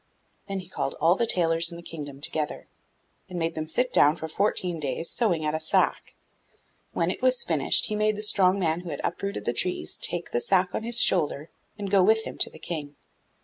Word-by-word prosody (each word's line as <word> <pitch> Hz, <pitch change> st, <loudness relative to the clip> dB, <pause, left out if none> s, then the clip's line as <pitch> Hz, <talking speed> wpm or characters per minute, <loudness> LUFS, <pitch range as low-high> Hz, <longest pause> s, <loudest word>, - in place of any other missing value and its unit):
Then 195 Hz, -1 st, -3 dB
he 180 Hz, -, -13 dB
called 175 Hz, -, -3 dB
all 165 Hz, +2 st, +4 dB
the 230 Hz, +5 st, 0 dB
tailors 165 Hz, -4 st, +3 dB
in 170 Hz, -, -8 dB
the 170 Hz, -, -11 dB
kingdom 145 Hz, -4 st, -8 dB
together, 150 Hz, 0 st, -3 dB, 0.6 s
and 180 Hz, -, -6 dB
made 165 Hz, -1 st, -1 dB
them 155 Hz, -1 st, -4 dB
sit 250 Hz, +10 st, 0 dB
down 150 Hz, +2 st, +5 dB
for 160 Hz, -, -6 dB
fourteen 180 Hz, -1 st, -1 dB
days 145 Hz, +3 st, -3 dB
sewing 175 Hz, -10 st, +1 dB
at 150 Hz, -, 0 dB
a 155 Hz, -, -1 dB
sack. 155 Hz, -, 0 dB, 0.8 s
When -, -, 0 dB
it -, -, -6 dB
was -, -, +2 dB
finished, -, -, +3 dB
he 215 Hz, -, -3 dB
made 215 Hz, 0 st, +1 dB
the 210 Hz, -, -3 dB
strong 195 Hz, -3 st, +3 dB
man 165 Hz, -3 st, 0 dB
who 175 Hz, -1 st, -8 dB
had 145 Hz, -, -5 dB
uprooted 200 Hz, +4 st, -3 dB
the 120 Hz, -, 0 dB
trees 180 Hz, +6 st, -1 dB
take 175 Hz, 0 st, -2 dB
the 120 Hz, -, 0 dB
sack 185 Hz, -1 st, +1 dB
on -, -, -2 dB
his 235 Hz, +1 st, +1 dB
shoulder 155 Hz, -, +2 dB, 0.3 s
and 200 Hz, -2 st, -5 dB
go 200 Hz, -2 st, +5 dB
with 220 Hz, +4 st, +3 dB
him -, -, -8 dB
to -, -, +2 dB
the -, -, -14 dB
King. 150 Hz, -3 st, -6 dB
175 Hz, 220 wpm, -26 LUFS, 160-200 Hz, 0.8 s, down